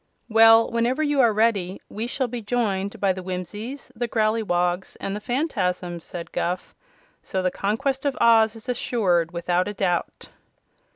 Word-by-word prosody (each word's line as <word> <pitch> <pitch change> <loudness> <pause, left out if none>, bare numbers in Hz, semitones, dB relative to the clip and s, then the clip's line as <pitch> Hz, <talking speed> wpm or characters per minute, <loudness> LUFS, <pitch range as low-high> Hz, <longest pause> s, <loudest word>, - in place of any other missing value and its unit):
"Well, 225 0 +7
whenever 240 +6 +1
you 290 -2 +2
are 235 -3 +5
ready, 205 -4 +1
we 220 +3 -4
shall 260 +1 -1
be 240 0 -5
joined 205 -3 -1
by 195 -2 +2
the 185 - -7
Whimsies, 205 +9 -6
the 240 +1 -2
Growleywogs 205 -5 0
and 195 - -3
the 210 - -5
Phanfasms," 185 - -2
said 170 -2 -8
Guph; 180 +1 -3 0.5
"so 190 -1 -3
the 185 - +1
conquest 260 +9 -1
of 280 -2 -1
Oz 225 -1 +5
is 225 +2 -11
assured 190 -9 +1
without 175 +1 0
a 205 - -5
doubt." 180 -3 -2
215 Hz, 160 wpm, -24 LUFS, 185-235 Hz, 0.5 s, Well